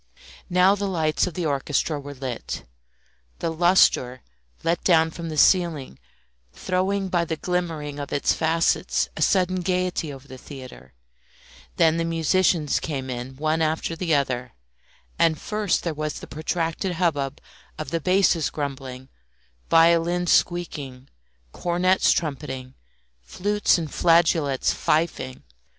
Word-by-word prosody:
Now 180 +2 +5
the 200 0 -2
lights 160 -3 +1
of 175 - -6
the 175 - -2
orchestra 145 +1 -1
were 145 0 -9
lit, 130 -2 -5 0.7
the 165 - -2
lustre, 160 -7 +3 0.4
let 170 +1 0
down 160 -2 +4
from 165 0 -6
the 155 - -5
ceiling, 160 - +2 0.5
throwing 190 - -1
by 175 -2 +1
the 165 -1 -3
glimmering 160 -4 -3
of 140 - -6
its 145 - +1
facets 165 +1 +1
a - - -6
sudden 185 -1 +2
gaiety 180 -3 -1
over 135 0 -11
the 130 -1 -11
theatre; 130 - -11 0.8
then 160 0 +3
the 165 - 0
musicians 165 -1 +1
came 135 -4 -4
in 125 +2 -6
one 155 +3 0
after 160 +1 -1
the 165 -2 0
other; 125 -3 -1 0.7
and 160 -3 +3
first 210 -3 -1
there 170 - -2
was 155 0 -3
the - - -8
protracted 165 +3 -2
hubbub 150 -5 -1 0.4
of 155 - -6
the 165 -1 -1
basses 185 -2 +2
grumbling, 135 -3 -6 0.6
violins 170 +1 +4
squeaking, 145 -7 -1 0.4
cornets 180 - +2
trumpeting, 135 -4 -3 0.5
flutes 205 - +1
and 160 -3 -4
flageolets 165 -5 +3
fifing. 150 -5 -1
160 Hz, 130 wpm, -24 LUFS, 140-175 Hz, 0.8 s, Now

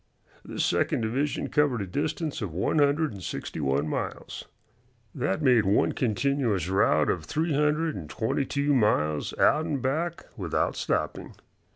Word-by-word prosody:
This - - -2
second - - +1
division 130 +7 -1
covered 145 -5 +2
a 100 - -2
distance 150 - -3
of 100 -6 -3
one 95 - +1
hundred 145 +2 +2
and 100 -3 -9
sixty 85 - -5
one 70 +1 0
miles. - - -4 0.7
That 145 +4 -1
made 125 -5 +5
one 100 +2 +2
continuous 120 - 0
route 80 -6 +3
of 80 -4 -4
three 160 - -1
hundred 150 +2 +1
and 80 -5 -7
twenty 110 - -1
two 140 +2 0
miles 75 - +1
out 155 +2 +3
and 145 -4 -1
back 160 +7 -2
without - - -1
stopping. - - -2
130 Hz, 155 wpm, -27 LUFS, 95-150 Hz, 0.7 s, made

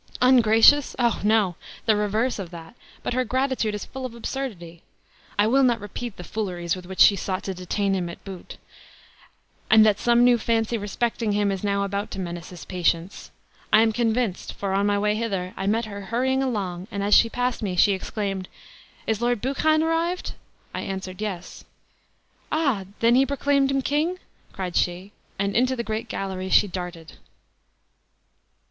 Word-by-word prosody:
"Ungracious! 250 +2 +5
O, 235 -3 +1
no! 210 -3 +3 0.3
the 220 - +4
reverse 215 +4 0
of 185 -3 -5
that; 165 0 -10 0.3
but - - -2
her 255 +1 +1
gratitude 255 -3 0
is 205 - -5
full 265 -1 -8
of 250 -2 -5
absurdity. 210 -10 -6 0.6
I 205 - +4
will 260 +5 +4
not 245 -3 +3
repeat 205 +2 -7
the 180 - -7
fooleries 175 -4 -3
with 180 -1 -10
which 190 0 -2
she 200 - +8
sought 190 0 -3
to 195 - -3
detain 195 +2 -1
him 180 -2 -1
at 170 - -10
Bute. 190 -3 -9 1.1
And 220 0 +7
that 210 -1 +3
some 240 0 +4
new 245 -1 +5
fancy 225 +1 0
respecting 220 +1 -1
him 205 -1 +1
is 195 0 -4
now 200 -1 +1
about 200 +1 -3
to - - -5
menace 175 -2 -5
his 180 -2 -10
patience. 175 0 -1 0.4
I 215 - +7
am 225 - +3
convinced; 230 -3 -1
for, 195 -1 -3
on 200 +1 +2
my 205 0 +2
way 210 +1 +1
hither, 195 -5 -3
I 195 - -3
met 225 +3 +1
her 200 -2 -7
hurrying 260 +5 0
along, 195 -8 -3
and 200 -3 -3
as 205 +1 +2
she 230 - +6
passed 245 +1 -1
me 195 -4 -2
she 200 +3 +5
exclaimed, 195 -1 -3 0.6
'Is 220 0 -1
Lord 240 -1 +1
Buchan 310 +6 +2
arrived?' 330 +2 -1 0.4
I - - -3
answered. 190 0 -6
'Yes.' 190 -4 -5 0.9
'Ah, 275 -11 +1 0.2
then 230 +1 +5
he 260 +2 +5
proclaimed 280 0 +1
him 275 -1 0
king?' 310 +7 0 0.3
cried 185 -2 -5
she; 180 +3 -1 0.3
and 200 0 -1
into 255 +2 +2
the 235 - -3
great 220 +1 -3
gallery 190 -1 -4
she 205 - +5
darted." 180 -3 -7
210 Hz, 180 wpm, -24 LUFS, 190-240 Hz, 1.1 s, she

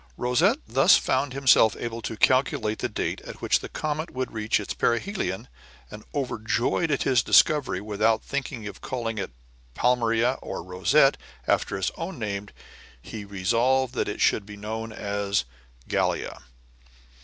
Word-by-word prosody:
Rosette 160 - +2
thus - - +6
found 140 - 0
himself 130 -5 +4
able 115 0 -4
to 110 0 -5
calculate 130 -5 +2
the - - -2
date - - -3
at - - -10
which - - +2
the - - -8
comet 155 +2 -3
would 130 0 -4
reach 110 -1 0
its 105 - -4
perihelion, 120 - -1 0.4
and, 105 - -9
overjoyed 125 +4 0
at 145 - +1
his 125 -2 +3
discovery, 145 -11 +4
without 110 +2 +1
thinking 130 -5 -4
of 105 - -8
calling 115 -4 -3
it 95 - -3 0.5
Palmyra 120 0 +2
or - - -6
Rosette, 100 - +3 0.3
after 95 - +1
his 95 - -1
own 170 +1 -5
name, 100 -3 -4 0.5
he 105 - -8
resolved 120 +7 +1
that - - -1
it 105 - -5
should 105 - +3
be 105 0 -11
known 110 +2 -5
as 100 - -1 0.4
Gallia. - - -1
115 Hz, 150 wpm, -25 LUFS, 105-130 Hz, 0.5 s, thus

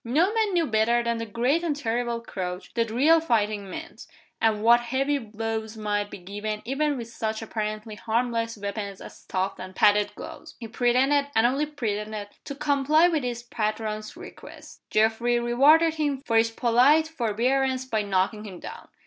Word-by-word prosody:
No 320 - +2
man 440 -3 +1
knew 340 -2 +2
better 235 0 +2
than 235 -1 -1
the 230 - -4
great 245 +9 +1
and 320 -4 0
terrible 235 -3 -2
Crouch 180 -4 -6
what 230 -1 0
real 290 +9 +4
fighting 210 -8 0
meant, 320 - -9 0.3
and 215 -1 +2
what 235 +1 +7
heavy 270 +4 0
blows 220 -1 -5
might 205 -1 -1
be - - -8
given 205 +3 -5
even 285 +3 0
with 235 -2 -6
such 220 -1 -4
apparently 215 0 -4
harmless 230 +1 -1
weapons 200 -1 -5
as - - -11
stuffed 190 +1 -3
and 185 0 -8
padded 205 0 +3
gloves. - - -10
He 230 - -7
pretended, 255 +5 +2
and 225 +1 +4
only 275 +5 +1
pretended, 210 -6 -4 0.2
to 280 - -6
comply 290 +4 +3
with 320 -3 0
his 240 -1 -3
patron's 215 -2 -3
request. - - -12
Geoffrey 225 +2 +2
rewarded 290 +8 +4
him 290 -4 -1
for 230 - +2
his 225 0 +4
polite 250 +7 +4
forbearance 260 0 0
by 225 -4 -1
knocking 200 +1 0
him 190 -5 -9
down. - - -9
230 Hz, 170 wpm, -26 LUFS, 215-270 Hz, 0.3 s, what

